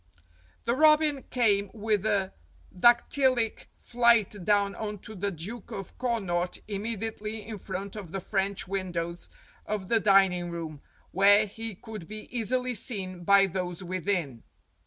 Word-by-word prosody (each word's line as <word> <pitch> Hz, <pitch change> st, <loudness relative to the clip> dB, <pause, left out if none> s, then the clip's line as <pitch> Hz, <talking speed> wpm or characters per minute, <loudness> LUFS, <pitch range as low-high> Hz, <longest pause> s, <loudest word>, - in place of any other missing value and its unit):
The 235 Hz, -, +2 dB
robin 305 Hz, 0 st, +4 dB
came 205 Hz, -5 st, +2 dB
with 215 Hz, -1 st, 0 dB
a 200 Hz, -3 st, 0 dB, 0.4 s
dactylic 240 Hz, +3 st, +3 dB
flight 235 Hz, -5 st, +2 dB
down 200 Hz, 0 st, +2 dB
on 210 Hz, -1 st, -5 dB
to 215 Hz, -, -6 dB
the 200 Hz, 0 st, -2 dB
Duke 195 Hz, +6 st, -7 dB
of 195 Hz, -2 st, -7 dB
Connaught 195 Hz, -8 st, -1 dB
immediately 215 Hz, +1 st, -4 dB
in 215 Hz, -2 st, -7 dB
front 190 Hz, +2 st, -6 dB
of 195 Hz, -6 st, -8 dB
the 195 Hz, -, -3 dB
French 195 Hz, +1 st, -2 dB
windows 175 Hz, -3 st, -3 dB, 0.4 s
of 205 Hz, -3 st, -3 dB
the 230 Hz, -, +4 dB
dining 190 Hz, -4 st, +4 dB
room, 160 Hz, -4 st, -6 dB, 0.3 s
where 205 Hz, +3 st, +5 dB
he 225 Hz, +1 st, -6 dB
could 215 Hz, -4 st, -9 dB
be 215 Hz, 0 st, -8 dB
easily 250 Hz, +2 st, 0 dB
seen 190 Hz, -6 st, -3 dB
by 200 Hz, +2 st, +6 dB
those 180 Hz, -1 st, -4 dB
within. 175 Hz, -, -2 dB
200 Hz, 135 wpm, -28 LUFS, 185-225 Hz, 0.4 s, by